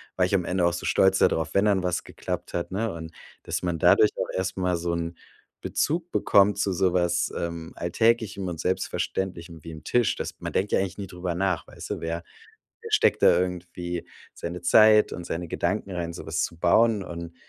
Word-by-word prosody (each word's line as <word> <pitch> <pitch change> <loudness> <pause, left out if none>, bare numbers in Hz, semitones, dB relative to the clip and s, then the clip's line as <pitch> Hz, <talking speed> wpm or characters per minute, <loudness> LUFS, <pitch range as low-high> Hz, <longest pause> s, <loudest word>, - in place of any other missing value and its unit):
war 90 - +3
ich 90 - -3
am 95 -2 +3
Ende 90 0 +1
auch 85 - +2
so 85 - -4
stolz 95 0 +4
da - - +6
drauf, 80 0 -2
wenn 100 +1 +3
dann 100 -3 +2
was 90 -1 -1
geklappt - - -6
hat, 85 +1 -3
ne? 110 +3 -1
Und 80 -1 -8 0.3
dass - - -3
man 85 -2 -1
dadurch - - +5
auch - - -2
erst 95 +1 -2
mal 90 -1 +1
so 85 0 -2
'n 85 0 -3 0.5
Bezug 165 +3 -1
bekommt 100 +1 +4
zu 100 -1 0
so 90 0 +1
was, 85 -1 +1
ähm, 85 -1 -5
Alltäglichem 105 +1 +1
und 85 -3 -4
Selbstverständlichem, 90 -2 -3
wie 80 - -7
'n 75 -1 -11
Tisch. 120 -3 +2
Das - - -5
man - - -5
denkt 100 +2 0
ja - - +3
eigentlich 95 -2 -3
nie 100 -1 -5
drüber 90 -1 -4
nach, 90 -1 -1
weißt - - -10
du? - - -2
Wer 85 +1 -4 0.6
wer - - -9
steckt - - +3
da - - +6
irgendwie 90 -1 -4 0.2
seine 85 +1 -6
Zeit 110 +4 +6
und 85 - -6
seine 85 +1 -4
Gedanken 100 +5 -2
rein, 85 -2 -4
so - - -8
was 80 +1 -1
zu 85 - -5
bauen? 105 +5 +3
Und 85 -1 -7
90 Hz, 215 wpm, -26 LUFS, 85-95 Hz, 0.6 s, da